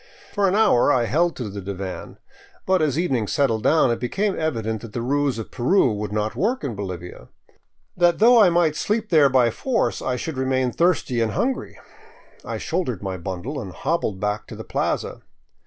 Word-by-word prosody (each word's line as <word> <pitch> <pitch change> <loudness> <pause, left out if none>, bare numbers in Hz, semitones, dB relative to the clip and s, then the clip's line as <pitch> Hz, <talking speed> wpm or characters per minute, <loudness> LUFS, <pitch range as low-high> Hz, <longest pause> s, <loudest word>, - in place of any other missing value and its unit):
For 200 -2 +2
an 190 - +1
hour 205 - +4
I 125 -4 +2
held 170 +7 +1
to 120 - -5
the 100 0 -6
divan. 95 -3 -6 0.5
But 185 -2 +2
as 150 -2 +1
evening 130 - 0
settled 115 -4 +1
down, 150 0 +3
it 115 - -1
be 125 - -3
came 200 - 0
evident 110 -9 -2
that 115 - -10
the 120 - -3
ruse 140 -1 0
of 110 - -7
Peru 130 - +2
would 105 0 -4
not 105 +1 -2
work 210 - -1
in 135 -5 -3
Bolivia; 90 -4 -7 0.7
that 175 -1 +3
though 235 +2 +6
I 195 - +6
might 170 -3 +2
sleep 215 +5 -1
there 150 -4 +6
by 125 -3 +3
force, 250 - -1
I 130 - -1
should 135 +2 -5
remain 130 -1 0
thirsty 160 -7 +1
and 110 -2 0
hungry. 260 +1 -2 0.7
I - - -4
shouldered 160 - -3
my 95 -1 -3
bundle 95 - -5
and 95 - -7
hobbled 110 - -2
back 105 +1 -2
to - - -9
the - - -8
plaza. - - -2
130 Hz, 195 wpm, -22 LUFS, 110-170 Hz, 0.7 s, though